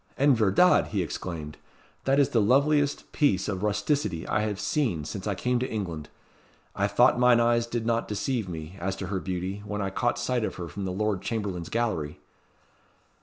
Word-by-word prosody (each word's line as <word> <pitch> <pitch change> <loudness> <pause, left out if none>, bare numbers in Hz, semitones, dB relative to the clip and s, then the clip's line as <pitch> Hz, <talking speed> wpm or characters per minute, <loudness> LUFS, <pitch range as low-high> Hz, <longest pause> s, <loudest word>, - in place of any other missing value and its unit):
"En 140 0 +5
verdad!" 115 - +4
he 100 -4 -1
exclaimed, 80 -2 -6 0.5
"that 135 +1 +3
is 140 - +4
the 115 - +2
loveliest 140 +6 +2
piece 100 -11 +2
of 95 -3 -2
rusticity 105 - 0
I - - +1
have 105 -2 -2
seen 105 - 0
since 95 +5 -5
I 100 - 0
came 125 +4 0
to 130 - -2
England. 85 -8 -4 0.7
I - - +1
thought - - +4
mine 125 -1 +5
eyes 120 0 +2
did 115 -1 -3
not 115 0 0
deceive 110 0 -2
me, 80 +2 -7
as 95 +2 -2
to 95 - -5
her 95 - 0
beauty, 95 +2 -4
when 105 0 -4
I 95 -1 -2
caught 120 +4 0
sight 120 0 -1
of - - -2
her 90 -2 -5
from 100 +3 -5
the 95 - -2
Lord 105 0 -1
Chamberlain's 100 -7 -3
gallery." 100 -11 -2
105 Hz, 190 wpm, -27 LUFS, 95-120 Hz, 0.7 s, En